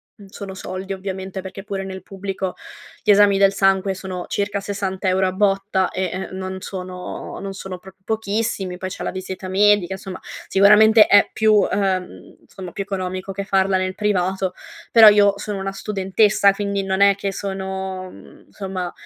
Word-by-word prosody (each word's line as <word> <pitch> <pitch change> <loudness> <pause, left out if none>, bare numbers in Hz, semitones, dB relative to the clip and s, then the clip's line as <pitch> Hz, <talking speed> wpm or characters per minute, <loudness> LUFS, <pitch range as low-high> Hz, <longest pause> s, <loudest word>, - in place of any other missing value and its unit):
mhmm, 205 - -15
sono 195 0 -8
soldi, 190 +1 -6
ovviamente, 190 0 -5
perché 190 +1 -9
pure 195 -1 -4
nel 190 0 -7
pubblico 195 -1 -5 0.5
gli 210 - +4
esami 200 -1 +5
del 195 0 +4
sangue 195 0 +2
sono 185 -1 -6
circa 200 0 -2
60 195 -1 -3
euro 190 +1 +2
a 185 - -2
botta 195 -1 +1
e, 185 -1 -2
ehm, 190 +1 -5
non 190 0 -5
sono 185 -2 -7
non 195 0 -6
sono 190 -1 -7
proprio 190 +1 -16
pochissimi. 215 -4 -2
Poi 185 - -4
c'è 185 - -7
la - - -2
visita 190 0 -6
medica, 200 -1 +3
insomma 190 -1 -7 0.3
sicuramente 210 +2 +6
è 205 0 +5
più 215 -1 +4
ehm, 190 -2 -2
insomma 185 -3 -10
più - - -5
economico 185 -1 -4
che 200 +1 -4
farla 195 -1 +2
nel 185 0 -2
privato 190 -2 0 0.4
però 225 -2 +9
io 205 -1 +4
sono 205 -1 -5
una 195 0 -3
studentessa, 200 0 +2
quindi 200 0 -2
non 190 0 -1
è 200 0 +7
che 200 0 -3
sono 190 -1 -5
mhmm, - - -16
insomma 190 -3 -5
195 Hz, 175 wpm, -21 LUFS, 190-200 Hz, 0.5 s, però